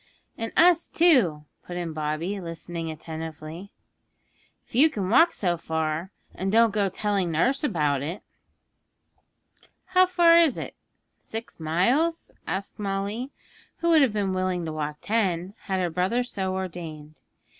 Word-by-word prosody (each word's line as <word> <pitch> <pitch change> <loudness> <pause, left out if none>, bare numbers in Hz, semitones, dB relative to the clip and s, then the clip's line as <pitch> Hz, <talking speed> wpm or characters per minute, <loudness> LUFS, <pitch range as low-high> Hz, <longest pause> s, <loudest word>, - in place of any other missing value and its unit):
'And 225 0 -4
us, 345 0 +5
too,' 240 - +3 0.2
put 175 - -7
in 170 -2 -4
Bobby, 155 +6 -3
listening 165 -1 -5
attentively. 160 +3 -7 0.9
'If - - -27
you 285 +7 +6
can 200 -8 -3
walk 330 +8 +6
so 175 - 0
far, 160 +2 -2 0.2
and 190 +1 -2
don't 230 +1 +5
go 205 -2 +1
telling 195 -1 -1
nurse 250 - +1
about 150 - +1
it.' 165 +8 -5 1.6
'How 370 0 +4
far 340 -2 +6
is 325 -6 +3
it? - - -6 0.5
Six 225 -2 -8
miles?' 240 - +1 0.2
asked 195 +5 -4
Molly, 200 +5 -3 0.5
who 340 - 0
would 320 -2 +6
have 260 -6 +3
been 200 -3 0
willing 185 -2 -1
to 160 - -4
walk 150 -1 -3
ten, 190 -4 0
had 190 -2 -1
her 175 -2 0
brother 185 +9 +1
so 190 -6 -3
ordained. 160 -5 -7
190 Hz, 145 wpm, -26 LUFS, 165-230 Hz, 1.6 s, you